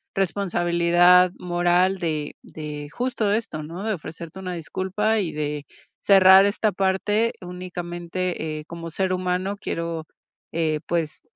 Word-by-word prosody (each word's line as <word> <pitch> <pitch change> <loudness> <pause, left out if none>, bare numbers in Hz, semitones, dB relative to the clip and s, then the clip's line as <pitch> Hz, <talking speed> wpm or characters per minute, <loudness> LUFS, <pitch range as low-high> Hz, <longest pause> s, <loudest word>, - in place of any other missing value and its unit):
responsabilidad 175 -1 +4
moral 175 +2 +2
de 155 -3 -2
de 150 -1 -7
justo 240 -1 -1
esto, 210 -8 -2
¿no?, 170 +6 -7
de 220 -1 0
ofrecerte 165 +1 -8
una 185 -1 -4
disculpa, 190 +6 -1
y 175 -5 -1
de 150 -1 -3 0.3
cerrar 190 0 +7
esta 210 +1 +1
parte. 200 +4 +1
Únicamente 175 -2 -4
eh, - - -8
como 165 0 -7
ser 185 +3 -1
humano, 185 +2 -1
quiero, 165 -5 -4 0.5
eh, 160 -2 0
pues, 165 -3 -2
180 Hz, 125 wpm, -24 LUFS, 165-190 Hz, 0.5 s, cerrar